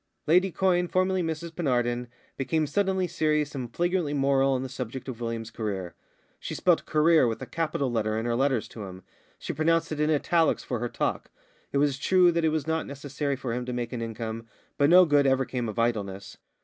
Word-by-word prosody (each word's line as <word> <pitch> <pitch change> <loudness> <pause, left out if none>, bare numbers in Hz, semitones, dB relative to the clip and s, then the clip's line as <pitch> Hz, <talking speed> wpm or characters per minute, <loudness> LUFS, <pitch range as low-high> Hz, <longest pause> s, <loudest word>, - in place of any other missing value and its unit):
Lady 180 +4 +4
Quyne, 180 0 +2
formerly 185 +1 +1
Mrs 165 0 -3
Penarden, 125 -6 -1 0.3
became 155 +4 0
suddenly 190 +4 0
serious 150 -3 0
and 125 -4 -5
flagrantly 175 -1 0
moral 135 -1 +3
on 130 0 -1
the - - -4
subject 130 0 -6
of 120 -3 -6
William's 115 -1 -4
career. 100 -6 -4 0.5
She - - -5
spelt 175 -3 +2
career 155 -3 +4
with 115 -1 -2
a 130 - -6
capital 140 -1 -2
letter 110 -2 0
in 110 - -2
her 120 -1 0
letters 130 -2 +1
to 110 -3 -8
him; 95 -1 -10 0.3
she - - -5
pronounced 165 +2 +1
it 155 - -3
in 150 0 +2
italics 160 +1 +2
in 125 - 0
her 120 +1 -2
talk. - - -2 0.4
It - - 0
was 140 -1 +1
true 180 +3 +4
that 170 0 0
it 160 - +4
was 155 -1 -1
not 160 0 -1
necessary 140 0 -3
for 130 -3 -4
him 125 +1 -2
to 125 - -3
make 120 0 -3
an 120 - -3
income, 115 0 -5 0.3
but 145 0 +3
no 180 +1 +8
good 145 -3 +3
ever 135 0 +2
came 120 -3 -3
of 110 - -7
idleness. 100 -4 -2
140 Hz, 210 wpm, -27 LUFS, 120-160 Hz, 0.5 s, no